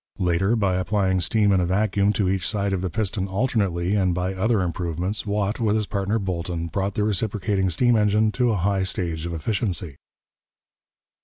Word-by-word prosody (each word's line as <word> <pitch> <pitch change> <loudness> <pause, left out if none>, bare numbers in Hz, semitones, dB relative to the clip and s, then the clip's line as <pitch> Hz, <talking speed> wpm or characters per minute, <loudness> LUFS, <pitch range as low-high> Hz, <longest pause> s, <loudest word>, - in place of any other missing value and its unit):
Later, 95 +5 +1
by 100 -5 +1
applying 95 0 +1
steam 105 +4 +2
and 95 -2 +3
a - - +1
vacuum 100 +1 +2
to 100 -3 0
each 95 -2 0
side 100 -2 -1
of 95 - -1
the 95 - -2
piston 100 0 -2
alternately, 95 -4 0
and 95 -4 +2
by 90 +1 -1
other 105 +2 +1
improvements, 90 +4 -3
Watt, 105 +2 -1
with 110 -2 +1
his 110 -1 0
partner 100 +2 -1
Boulton, 85 -4 -3
brought 95 +3 -2
the 105 - +1
reciprocating 100 -1 0
steam 120 +8 +3
engine 105 0 +3
to 125 +1 +1
a 110 - +1
high 95 +2 +1
stage 85 -4 -2
of 85 - -5
efficiency. 90 - -2
95 Hz, 180 wpm, -23 LUFS, 90-105 Hz, -, and